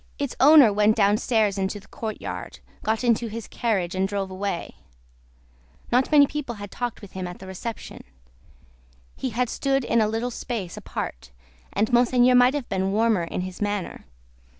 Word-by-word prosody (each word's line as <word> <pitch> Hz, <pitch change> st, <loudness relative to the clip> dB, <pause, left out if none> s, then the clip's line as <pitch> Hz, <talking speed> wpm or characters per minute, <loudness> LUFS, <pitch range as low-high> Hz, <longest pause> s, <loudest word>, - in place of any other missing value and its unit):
Its 280 Hz, -3 st, -3 dB
owner 280 Hz, -6 st, +8 dB
went 210 Hz, +1 st, +3 dB
downstairs 210 Hz, 0 st, +2 dB
into 195 Hz, +2 st, -2 dB
the 195 Hz, -, -19 dB
courtyard, 220 Hz, -2 st, -6 dB, 0.2 s
got 220 Hz, +2 st, -1 dB
into 235 Hz, -1 st, +2 dB
his 225 Hz, 0 st, -7 dB
carriage, 195 Hz, -7 st, -1 dB
and 190 Hz, +1 st, 0 dB
drove 195 Hz, -1 st, -3 dB
away. 185 Hz, -2 st, -4 dB, 1.1 s
Not 250 Hz, +4 st, +2 dB
many 290 Hz, -2 st, +7 dB
people 275 Hz, -4 st, -5 dB
had 205 Hz, -1 st, -9 dB
talked 240 Hz, -3 st, -4 dB
with 200 Hz, -, -11 dB
him 185 Hz, -1 st, -5 dB
at 175 Hz, -, -8 dB
the 190 Hz, -, -11 dB
reception; 190 Hz, +5 st, -7 dB, 1.1 s
he 260 Hz, -, -3 dB
had 245 Hz, +2 st, 0 dB
stood 270 Hz, +2 st, 0 dB
in 230 Hz, -, +2 dB
a 215 Hz, -, +3 dB
little 225 Hz, +3 st, -2 dB
space 225 Hz, -7 st, -5 dB
apart, 65 Hz, +1 st, -6 dB, 0.4 s
and 215 Hz, +5 st, 0 dB
Monseigneur 245 Hz, +1 st, +4 dB
might 250 Hz, +2 st, +5 dB
have 280 Hz, -4 st, -3 dB
been 190 Hz, 0 st, -1 dB
warmer 215 Hz, -4 st, +2 dB
in 165 Hz, -, -4 dB
his 185 Hz, +1 st, -7 dB
manner. 205 Hz, -2 st, -3 dB
220 Hz, 170 wpm, -24 LUFS, 195-245 Hz, 1.1 s, owner